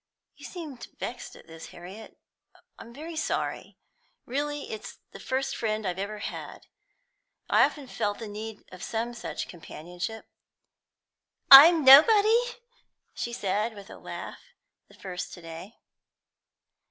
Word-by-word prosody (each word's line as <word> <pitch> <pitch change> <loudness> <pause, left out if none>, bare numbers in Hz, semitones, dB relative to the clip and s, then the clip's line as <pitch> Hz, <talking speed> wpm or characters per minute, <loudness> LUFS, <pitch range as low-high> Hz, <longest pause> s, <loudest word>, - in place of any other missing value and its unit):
"You - - -13
seem 310 -8 -8 0.2
vexed 245 - -6
at - - -16
this, 165 0 -11
Harriet. 190 +6 -12 0.6
I'm 230 - -11
very 315 +6 -8
sorry. 315 - -3 0.5
Really, 290 +3 -3
it's 220 - -8
the - - -11
first 270 +1 -2
friend 215 -3 -2
I've 180 0 -3
ever 205 +2 -4
had. - - -7 0.9
I've - - +5
often 290 -3 -11
felt 205 -4 -2
the 225 - -7
need 215 +1 -8
of 185 0 -11
some 235 +2 -3
such 235 - -6
companionship." 175 +5 -8 1.3
"I'm 305 +3 +10
nobody?" 435 - +7 0.6
she 240 - -4
said, 215 0 -2
with 200 +1 -12
a - - -11
laugh, - - -8 0.5
the - - -19
first 180 -2 -7
today. 170 +4 -10
225 Hz, 130 wpm, -27 LUFS, 200-280 Hz, 1.3 s, I'm